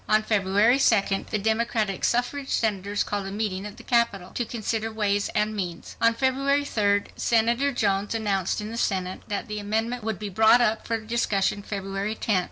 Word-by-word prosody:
On 215 0 +4
February 210 +4 +3
2d, 200 -6 +2
the 215 - -1
Democratic 220 -2 0
Suffrage 270 +3 0
Senators 205 -2 0
called 200 -2 -3
a - - -5
meeting 205 -1 -3
at 205 - -11
the - - -12
Capitol 220 -7 +1
to 240 - -2
"consider 225 -1 -3
ways 205 -2 0
and 215 +1 +1
means." 175 -4 -5
On 230 0 +4
February 275 +3 +1
3d, 205 -6 +1
Senator 235 +4 +2
Jones 205 -3 0
announced 200 -4 0
in 210 +1 -6
the 230 - -5
Senate 185 -5 -1
that 205 - -3
the 210 0 -4
amendment 225 +3 -2
would 220 -2 -2
be 210 -1 -5
brought 220 +5 +5
up 225 -2 +1
for 230 - 0
discussion 215 -3 0
February 200 +1 -4
10th. 210 -3 +1
215 Hz, 180 wpm, -25 LUFS, 200-230 Hz, -, brought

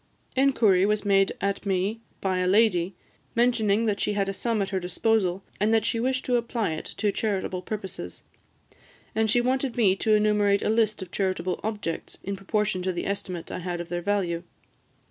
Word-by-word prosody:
Inquiry 235 -9 +4
was 210 +1 +1
made 195 -1 +3
at 200 0 -1
me 200 +3 -1 0.2
by 190 -1 0
a 180 - +1
lady, 190 -3 +3 0.4
mentioning 230 -3 +3
that 205 -2 0
she 210 - 0
had 200 -1 0
a 195 - -1
sum 230 +2 -1
at 195 - -4
her 190 - 0
disposal, 190 +1 0 0.2
and 210 +2 +2
that 225 -1 +3
she 230 - 0
wished 255 +2 0
to 250 -1 +2
apply 235 -5 -1
it 155 - -5
to 210 -2 +1
charitable 195 -3 -2
purposes; 190 - -6 0.9
and 220 0 +1
she 240 +3 +4
wanted 255 0 0
me 200 -5 +4
to 215 +1 +3
enumerate 210 -1 +3
a - - +1
list 215 -2 +2
of 185 - -12
charitable 185 -2 -1
objects, 210 -6 -4
in 200 +1 -3
proportion 195 -1 -1
to 185 +1 0
the 175 - -4
estimate 185 -3 -4
I - - -4
had 175 -1 -3
of 175 0 -6
their 175 0 -2
value. 175 -3 0
200 Hz, 190 wpm, -26 LUFS, 185-220 Hz, 0.9 s, Inquiry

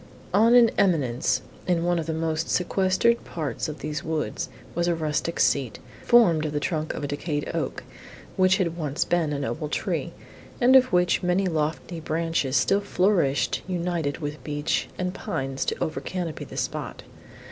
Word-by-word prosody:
On 230 +4 +5
an 235 -2 +7
eminence, 140 -11 +2 0.2
in 175 -2 +2
one 175 0 +1
of 160 - -4
the - - -1
most 160 0 -1
sequestered 190 +6 +2
parts 155 -2 -4
of 155 - -8
these 150 0 -4
woods, 160 -1 -2 0.2
was 170 +1 0
a 170 - +2
rustic 160 +1 -2
seat, 135 -5 +2 0.3
formed 185 -10 +5
of 155 -1 -3
the 145 - 0
trunk 155 0 -2
of - - -5
a - - -1
decayed 145 +1 -3
oak, - - -3 0.5
which 185 0 +4
had 170 -4 -1
once 150 -2 -1
been 170 -3 +1
a 145 - -1
noble 150 +2 -3
tree, - - -2 0.5
and 255 +2 +5
of 255 -1 +6
which 180 -1 +3
many 180 +2 +1
lofty 160 0 -2
branches 160 -3 0
still 200 - +3
flourishing 185 -8 +1
united 175 -5 -1
with 145 -4 -6
beech 145 +1 -1
and 180 0 -2
pines 135 -6 -3
to - - -1
over 155 - -2
canopy 175 -4 -4
the - - -10
spot. - - -4
165 Hz, 170 wpm, -25 LUFS, 150-180 Hz, 0.5 s, an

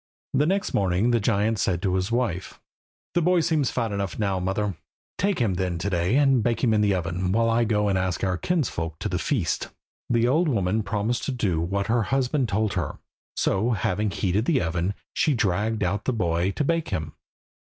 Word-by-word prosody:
The 145 +3 +3
next 195 +2 0
morning 95 +4 +2
the 120 - +3
giant 105 0 +1
said 90 -2 +1
to 95 -3 +1
his 95 +3 -1
wife 115 -7 -2 0.5
"The 175 - +2
boy 180 +1 +3
seems 155 -4 +1
to - - -1
be - - -14
fat 115 -2 0
enough 100 -2 -3
now, 100 -3 0
mother; 95 +1 -1 0.4
take 200 0 +1
him 115 -7 +1
then 90 -1 -1
to 95 +4 -2
day, 90 +5 +1
and 135 -3 +4
bake 115 +3 0
him 115 -3 +4
in 105 - +3
the 100 -2 +3
oven, 90 +1 -2
while 115 +2 +2
I 115 +1 +2
go 105 -1 +1
and 95 -2 +1
ask 90 -2 -2
our 95 -1 +1
kinsfolk 90 - -2
to - - -3
the - - -2
feast." - - -1 0.4
The 120 0 +3
old 160 +7 +3
woman 105 -5 +1
promised 110 +3 -1
to - - -1
do 100 -10 0
what 100 +4 -1
her 115 +3 +2
husband 130 +3 0
told 105 +1 0
her. 95 - -3 0.4
So, 110 +6 +1
having 105 0 0
heated 100 +2 0
the 155 -3 +2
oven, 85 +3 -1 0.2
she 150 - +2
dragged 105 +1 0
out 100 +3 -1
the 130 - +1
boy 85 -3 0
to 150 - -1
bake 165 +2 0
him. 80 -1 -3
105 Hz, 215 wpm, -25 LUFS, 95-120 Hz, 0.5 s, and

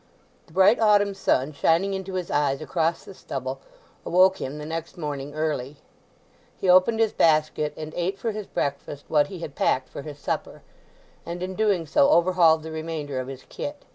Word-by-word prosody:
The - - -20
bright 195 +5 +5
autumn 205 -2 +4
sun 155 -7 0
shining 170 +7 +2
into 190 0 -5
his 180 -2 -3
eyes 140 -2 +1
across 165 +1 -1
the - - -10
stubble 135 -5 -5 0.4
awoke 185 +1 +4
him 135 +3 -4
the 150 - -7
next 165 +2 -5
morning 145 -2 -5
early. 150 -3 -2 0.8
He - - -3
opened 185 +5 +5
his 225 -2 +2
basket 155 -1 +2
and 155 0 -7
ate 180 +3 -1
for 225 +3 -2
his 210 -1 -6
breakfast 140 0 -4
what 150 -2 +3
he 190 - -8
had 150 - -6
packed 130 -1 0
for - - -7
his 145 0 -9
supper; - - -4 0.6
and 175 +1 -5
in 185 +1 -4
doing 200 -4 +1
so 280 - +3
overhauled 170 - +4
the 160 - -7
remainder 155 -4 -4
of 130 - -5
his 130 -1 -8
kit. 290 0 -7
165 Hz, 185 wpm, -25 LUFS, 145-190 Hz, 0.8 s, bright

